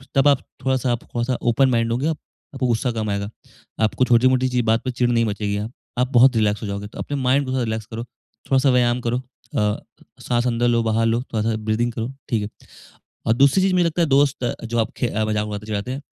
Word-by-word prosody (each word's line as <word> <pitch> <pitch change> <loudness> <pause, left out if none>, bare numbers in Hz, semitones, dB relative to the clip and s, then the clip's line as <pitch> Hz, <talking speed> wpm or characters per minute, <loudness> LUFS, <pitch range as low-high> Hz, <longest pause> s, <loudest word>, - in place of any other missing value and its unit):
तब 135 +1 +4
आप 140 -2 +4 0.2
थोड़ा-सा 130 -1 +1
आप 120 - -1
थोड़ा-सा 120 +1 -2
ओपन 130 +3 +3
माइंड 115 -2 +1
होंगे 125 +6 0 0.5
आपको 135 -2 -1
गुस्सा 120 +1 0
कम 110 -2 -3
आएगा। 100 0 -2 0.6
आपको 125 +4 +1
छोटी-मोटी 130 +2 +4
चीज 125 -1 +1
बात 115 +1 +2
पे 130 - 0
चिढ़ 125 0 +1
नहीं 115 -1 +2
मचेगी 105 -1 -2
हाँ। 105 +3 -4 0.3
आप 125 - +3
बहुत 125 +1 +6
रिलैक्स 105 -2 +1
हो - - -3
जाओगे 100 +1 -4
तो - - -12
अपने 145 - -3
माइंड 130 +2 +2
को 130 - -4
थोड़ा 130 -1 0
रिलैक्स 110 -1 -3
करो, 115 +1 -6
थोड़ा-सा 135 +2 -2
व्यायाम 125 0 +2
करो, 120 0 0 0.4
अ, 105 0 +1 0.4
साँस 120 0 0
अंदर 120 0 +1
लो 120 -1 +3
बाहर 115 0 +1
लो 115 +1 +1
थोड़-सा 110 0 0
ब्रीथिंग 115 +2 0
करो 115 +2 -3 0.2
ठीक 115 -4 +1
है। 105 - -4 0.8
और 110 - +4
दूसरी 140 +8 +4
चीज 190 0 +2
मुझे 180 -1 +3
लगता 170 +1 0
है - - +3
दोस्त 140 -2 +2
अ, 120 - 0
जो 120 +1 -2
आपके 115 +2 -1 0.6
चिढ़ाते 105 +2 -3
हैं। 135 +2 -5
120 Hz, 220 wpm, -22 LUFS, 110-130 Hz, 0.8 s, बहुत